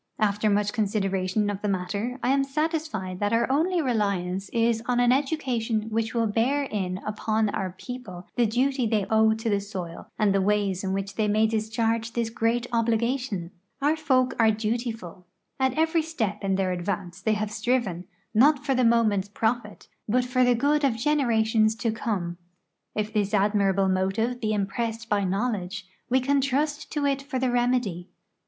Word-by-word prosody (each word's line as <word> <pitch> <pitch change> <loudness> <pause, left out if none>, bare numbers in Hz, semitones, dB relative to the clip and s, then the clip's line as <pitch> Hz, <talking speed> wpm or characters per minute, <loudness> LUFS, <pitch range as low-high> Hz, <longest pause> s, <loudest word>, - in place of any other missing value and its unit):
After 210 0 +1
much 205 0 +1
consideration 195 -2 0
of 200 0 -6
the 210 - -1
matter, 200 +6 -2
I - - +1
am 275 +1 +3
satisfied 285 - -2
that 205 +1 0
our 230 +1 +3
only 335 +4 +2
reliance 200 -6 -1
is 230 -1 +1
on 245 -1 +2
an 245 0 +4
education 245 -6 0
which 225 +1 -1
will 230 -1 +2
bear 235 +7 +1
in 190 -8 -3
upon 215 0 0
our 190 -2 -3
people 210 -9 -8
the 240 -2 +3
duty 255 +2 +1
the}" 215 -3 +1
owe 220 0 +4
to 225 +1 -5
the 205 -2 +2
soil 185 -4 -7
and 210 -2 +3
the 195 - +2
ways 200 -1 +1
in 190 - -1
which 195 +1 -3
they 215 -1 +2
may 215 +1 +3
discharge 225 +1 -1
this 230 -1 -1
great 230 +1 0
obligation. 230 -4 0 0.3
Our 290 +3 +2
folk 260 -5 +2
are 225 -1 +6
dutiful; 220 -5 -3 0.3
at 265 +1 +1
every 320 +1 +3
step 220 -11 -3
in 195 -1 +1
their 190 -1 0
advance 180 0 -4
they 220 +2 +1
have 210 0 -2
striven, 220 -5 -1 0.3
not 280 +5 +4
for 275 - +2
the 255 -1 +2
moment's 220 -4 +3
profit, 220 0 -2 0.2
but 250 +3 +2
for 255 0 +2
the 245 -1 +4
good 290 +5 +2
of 265 -5 +3
generations 225 -5 +2
to 225 0 -1
come. 190 -6 -3 0.6
If 215 0 -2
this 205 0 +1
admirable 200 -1 +2
motive 195 +6 0
be 215 -2 0
impressed 225 +3 -2
by 205 -1 +1
knowledge, 200 -1 -2 0.2
we 260 +2 +4
can 275 +2 +2
trust 290 +2 -1
to 295 -2 0
it 275 -1 +1
for 275 -1 -4
the 255 -1 +1
remedy. 240 -8 0
220 Hz, 175 wpm, -26 LUFS, 200-250 Hz, 0.6 s, are